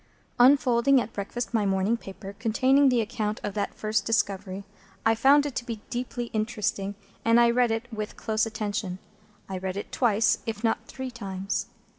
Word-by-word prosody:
Unfolding 260 0 +5
at 230 - -4
breakfast 235 +5 -4
my 220 -2 +2
morning 195 +3 +1
paper, 195 -2 -9
containing 260 +5 +4
the 245 -2 +3
account 215 -1 -2
of 205 - -3
that 205 -1 -2
first 215 0 0
discovery, 200 -3 -1 0.4
I 225 - +5
found 280 +5 +5
it 290 - -3
to - - -2
be 230 -3 -5
deeply 240 -1 -4
interesting, 210 -2 -1 0.3
and 230 +1 +5
I 235 0 +5
read 245 0 +3
it 225 +1 -2
with 215 -1 -5
close 220 0 0
attention. 210 -4 -3 0.5
I 190 -1 -4
read 190 0 -4
it 200 - -6
twice, 230 -3 +2
if 220 0 -4
not 225 - 0
three 260 -1 -6
times. 195 -3 -3
225 Hz, 175 wpm, -27 LUFS, 205-240 Hz, 0.5 s, Unfolding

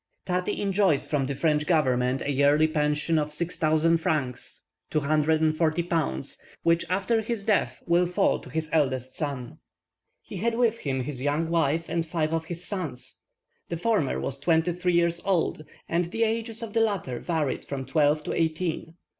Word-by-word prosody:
Tati 180 -1 -1
enjoys 195 -6 +2
from 145 -3 0
the 140 +1 -3
French 150 0 +1
government 130 -6 +2
a 145 - -1
yearly 145 +3 +4
pension 150 +1 +1
of 150 0 -2
6,000 160 0 +2
francs 145 -6 -2 0.3
(240 155 +2 +2
pounds), 160 - -2 0.2
which, 170 0 +3
after 200 +5 +1
his 220 -1 -3
death, 215 -1 0
will 175 +1 +3
fall 180 - +2
to - - -12
his 160 0 -2
eldest 130 -4 +1
son. 140 -6 -4 0.6
He - - -8
had 230 +5 0
with 230 -1 +2
him 130 -2 -2
his 130 -1 -5
young 150 +4 0
wife 165 0 +1
and 165 0 -1
five 160 -1 -1
of 165 0 -1
his 170 +1 -5
sons; 160 -12 -5 0.5
the 170 - -2
former 185 - +1
was 135 - -1
twenty 165 +2 +2
three 180 +1 0
years 170 0 +2
old, 175 -5 0 0.2
and 170 +2 +1
the 225 +7 -1
ages 225 +1 -1
of 215 -2 -6
the 225 - +3
latter 195 - -1
varied 160 -6 -1
from 135 -2 -5
twelve 150 +2 +2
to - - -3
eighteen. 165 0 -1
160 Hz, 170 wpm, -26 LUFS, 150-180 Hz, 0.6 s, yearly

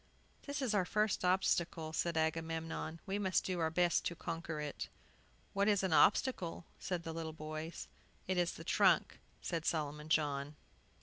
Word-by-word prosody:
"This 285 -1 -2
is 240 -4 +1
our 200 -3 +3
first 210 +1 +1
obstacle," 175 -3 +1
said 170 0 0
Agamemnon; 160 0 -1
"we 195 +1 -1
must 190 -2 +2
do 185 -2 -1
our 160 -1 +2
best 175 +1 +2
to 170 - -1
conquer 165 -1 -4
it." 150 -1 -4 0.6
"What 200 +1 +2
is 205 -2 +3
an 185 -4 +1
obstacle?" 180 -3 +3 0.2
asked 180 -2 -2
the 165 - -4
little 160 -1 -4
boys. 155 +1 -6 0.4
"It 185 -1 +1
is 175 0 +1
the 165 - -9
trunk," 185 -1 +3 0.2
said 165 -2 -2
Solomon 150 -1 -1
John. 145 -1 +1
165 Hz, 165 wpm, -36 LUFS, 160-185 Hz, 0.6 s, our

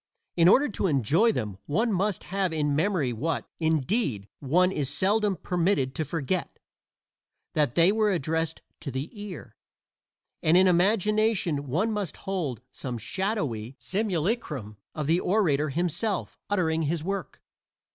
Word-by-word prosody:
In 170 -1 +5
order 275 +10 +6
to 200 -3 -1
enjoy 155 - +3
them 105 - -4
one 220 +9 +1
must 195 +1 0
have 190 -1 -1
in 150 -2 0
memory 160 -6 +1
what, 135 +1 -2
indeed, 160 - 0
one 180 +7 +3
is 145 -7 -2
seldom 200 +7 +1
permitted 170 -8 0
to 160 - -2
forget: 165 +4 -3 1.0
that 145 -6 +1
they 170 +3 +6
were 215 -1 +2
addressed 160 -1 -1 0.2
to 145 - -5
the 135 +4 -4
ear; 205 -6 -8 0.9
and 160 +3 +4
in 185 - +6
imagination 190 -4 +2
one 185 - 0
must 205 -6 -3
hold 170 - -3
some 125 -3 -5
shadowy 135 - -2
simulacrum 160 - -2 0.2
of 150 - -2
the 165 +4 +3
orator 160 -8 +2
himself, 180 +7 -2
uttering 165 -5 +1
his 160 +1 -1
work. 195 +2 -4
170 Hz, 135 wpm, -27 LUFS, 145-200 Hz, 1.0 s, order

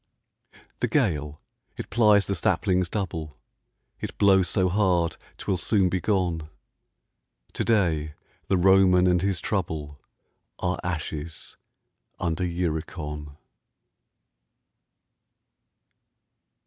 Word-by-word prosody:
The - - +1
gale, 75 -1 0 0.4
it - - -7
plies 105 -4 +5
the 100 - -1
saplings 90 0 +1
double, 80 - -4 0.6
It - - -6
blows 95 -3 +4
so 95 0 +2
hard, 90 -3 +1 0.2
'twill 95 - -1
soon 95 +1 +2
be 95 0 -1
gone: 85 -6 0 1.0
To - - -1
day 80 -9 +1 0.3
the 95 - +2
Roman 95 0 +5
and 90 -1 +3
his 95 -2 0
trouble 80 -8 -3 0.6
Are 90 +1 -2
ashes 80 -2 -5 0.6
under 85 +1 -1
Uricon. 80 -4 -4
90 Hz, 95 wpm, -26 LUFS, 80-95 Hz, 1.0 s, plies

